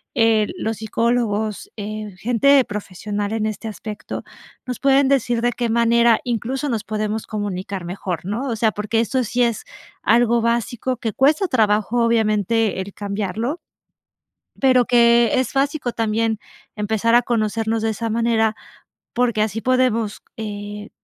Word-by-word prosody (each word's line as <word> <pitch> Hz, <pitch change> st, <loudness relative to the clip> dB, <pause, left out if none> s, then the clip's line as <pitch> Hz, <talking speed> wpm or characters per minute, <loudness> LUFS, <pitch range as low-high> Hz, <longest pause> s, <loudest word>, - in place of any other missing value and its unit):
Eh, 225 Hz, -3 st, +3 dB
los 220 Hz, -1 st, -2 dB
psicólogos, 220 Hz, -1 st, -1 dB
eh, 210 Hz, -1 st, -6 dB
gente 260 Hz, +4 st, +4 dB
profesional 205 Hz, +1 st, -4 dB
en 220 Hz, -1 st, -1 dB
este 215 Hz, +1 st, -5 dB
aspecto, 210 Hz, 0 st, -7 dB, 0.4 s
nos 250 Hz, -2 st, -4 dB
pueden 275 Hz, 0 st, +4 dB
decir 245 Hz, -3 st, +1 dB
de 240 Hz, +1 st, +2 dB
qué 240 Hz, 0 st, -2 dB
manera 235 Hz, 0 st, +4 dB
incluso, 255 Hz, +4 st, -2 dB
nos 225 Hz, -3 st, -1 dB
podemos 215 Hz, 0 st, -3 dB
comunicar 195 Hz, -3 st, -4 dB
mejor, 180 Hz, -2 st, -4 dB
¿no? 230 Hz, +8 st, -3 dB
O 230 Hz, -, -1 dB
sea, 220 Hz, 0 st, +2 dB
porque 210 Hz, +2 st, -1 dB
esto 250 Hz, +3 st, 0 dB
sí 245 Hz, +3 st, +1 dB
es 235 Hz, -3 st, 0 dB, 0.4 s
algo 235 Hz, +1 st, +3 dB
básico 235 Hz, +2 st, -1 dB
que 225 Hz, -2 st, -3 dB
cuesta 305 Hz, -, +3 dB
trabajo, 220 Hz, -, +2 dB
obviamente, 220 Hz, -2 st, +1 dB
el 195 Hz, +1 st, -8 dB
cambiarlo, 210 Hz, -, -3 dB, 1.0 s
pero 255 Hz, -2 st, +5 dB
que 235 Hz, -1 st, +5 dB
es 260 Hz, -, -1 dB
básico, 275 Hz, -2 st, 0 dB
también 225 Hz, -1 st, 0 dB, 0.4 s
empezar 220 Hz, +2 st, +1 dB
a 240 Hz, -, +5 dB
conocernos 225 Hz, -1 st, 0 dB
de 225 Hz, -, +1 dB
esa 225 Hz, +1 st, -3 dB
manera, 225 Hz, -1 st, +1 dB, 0.6 s
porque 235 Hz, -3 st, +1 dB
así 220 Hz, +1 st, -3 dB
podemos, 250 Hz, -4 st, +1 dB, 0.2 s
eh, 205 Hz, -1 st, -6 dB
225 Hz, 145 wpm, -21 LUFS, 210-240 Hz, 1.0 s, pero